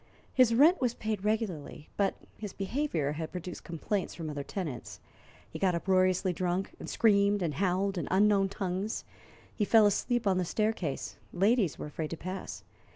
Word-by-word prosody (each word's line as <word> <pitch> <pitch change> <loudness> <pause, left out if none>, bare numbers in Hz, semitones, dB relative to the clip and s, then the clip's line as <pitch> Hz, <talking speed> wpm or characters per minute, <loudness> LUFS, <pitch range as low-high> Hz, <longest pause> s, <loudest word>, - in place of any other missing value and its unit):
His 250 -3 +5
rent 310 +8 +6
was 245 -2 +1
paid 215 -3 -3
regularly, 205 -9 -2
but 200 -1 +1 0.2
his 210 -3 -7
behavior 195 - -1
had 160 +1 -4
produced 180 -1 -6
complaints 175 +4 -3
from 160 -3 -5
other 145 -1 -4
tenants. 150 -4 -5 0.5
He - - -8
got 185 -3 +2
uproariously 185 +1 +2
drunk, 180 +2 -1
and - - -7
screamed 200 -2 +3
and 160 -3 -1
howled 190 +3 0
in 155 - -4
unknown 195 0 +4
tongues. 195 +2 -3 0.5
He 210 - -1
fell 220 +1 +6
asleep 240 +4 +1
on 190 -2 +3
the - - +1
staircase, 195 -5 -2
and 180 - -7
ladies 205 - +3
were - - -5
afraid 150 +1 -4
to 165 - -5
pass. 185 +3 -6
195 Hz, 170 wpm, -30 LUFS, 175-210 Hz, 0.5 s, rent